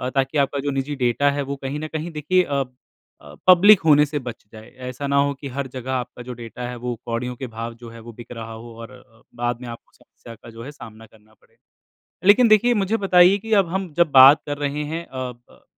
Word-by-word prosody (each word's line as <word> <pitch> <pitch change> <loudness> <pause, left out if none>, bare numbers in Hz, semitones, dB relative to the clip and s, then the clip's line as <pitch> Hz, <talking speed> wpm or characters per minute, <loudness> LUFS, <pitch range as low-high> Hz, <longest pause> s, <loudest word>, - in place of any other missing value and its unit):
ताकि 135 +2 0
आपका 140 0 0
जो 145 - 0
निजी 135 +2 -3
डाटा 130 +2 +1
है, 145 - -1
वो 140 0 -4
कहीं 135 +1 -5
ना 155 - -5
कहीं, 160 +2 -5
देखिए, 160 +5 +1
अ, 140 -4 -1 0.6
अ, 75 -1 -14
पब्लिक 185 +3 +7
होने 150 -1 +6
से 145 0 -4
बच 120 - -7
जाए। 110 +1 -12 0.2
ऐसा 140 +3 -5
ना 140 - +1
हो 140 - -2
कि 140 +1 -9
हर 140 0 -3
जगह 130 0 -5
आपका 125 -1 -5
जो 125 0 -7
डाटा 120 +1 -7
है, 125 - -6
वो 120 0 -4
कौड़ियों 120 +1 -3
के 130 0 -7
भाव 115 +1 -6
जो 120 0 -12
है, 115 0 -12
वो 115 +1 -11
बिक 120 +1 -13
रहा 115 -2 -8
हो 115 +1 -11
और 115 +1 -10
अ, 115 -3 -19
बाद 120 0 -3
में 125 - -8
आपको 115 - -11
समस्या 115 -1 -15
का 115 - -15
जो 115 +1 -11
है 140 - -8
सामना 115 -5 -13
करना 110 0 -24
पड़े। - - -31 0.7
लेकिन 225 +4 +6
देखिए, 235 +3 +4
मुझे 215 +4 0
बताइए 185 -1 +4
कि 225 +2 -8
अब 175 - -10
हम 190 -1 -4
जब 170 -3 +3
बात 135 +2 +8
कर 145 0 -4
रहे 145 +1 -3
हैं, 165 +1 -4
अ, 130 -1 -6
ब, 120 0 -24
135 Hz, 245 wpm, -22 LUFS, 120-150 Hz, 0.7 s, बात